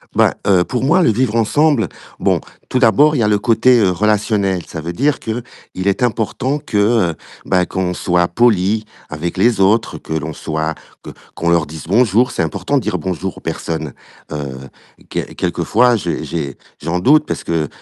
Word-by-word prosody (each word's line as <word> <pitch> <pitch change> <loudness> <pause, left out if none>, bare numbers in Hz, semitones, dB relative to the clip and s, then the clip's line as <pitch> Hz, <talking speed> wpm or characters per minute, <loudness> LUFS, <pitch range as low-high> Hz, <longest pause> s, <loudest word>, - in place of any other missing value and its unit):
Ben, - - +4
heu, 95 -3 +4
pour 125 -1 -2
moi, 170 +7 +4
le 115 - +4
vivre 120 0 0
ensemble, 120 - +2 0.3
bon, - - +1 0.3
tout 130 - 0
d'abord, 140 +6 +4
il - - 0
y 105 - +2
le 105 - +3
côté, 120 +3 +4
heu, 95 -3 +3
relationnel. 100 -1 +1
Ça 80 - -7
veut 85 +2 -4
dire 145 +9 +1
qu'il 115 +2 -4 0.4
est 100 - +1
important 125 +3 0
que, 145 -7 -4 0.3
heu, - - -10 0.3
ben, 90 -1 +2
qu'on 90 0 -2
soit 90 -1 +1
poli 105 +1 +2 0.2
avec 85 +4 -4
les 110 +1 +3
autres, 105 +4 +2
que - - -6
l'on 80 0 -3
soit, 80 +1 -3 0.3
que - - -8 0.2
qu'on 85 - -1
leur 85 -3 +2
dise 80 0 -9
bonjour, 115 +4 +3
c'est - - -2
important 80 -3 -1
de - - +1
dire: - - -2
«Bonjour» 95 0 -4
aux - - -8
personnes, 80 -4 -4 0.4
heu, 70 -3 -5 0.5
quel - - -4
quelquefois, 125 +2 +2
j'ai 105 - -3
j'ai 70 -2 -4 0.2
j'en 85 +4 -1
doute 150 +10 +4
parce - - -3
que, 80 -2 -1
100 Hz, 185 wpm, -17 LUFS, 85-120 Hz, 0.5 s, Ben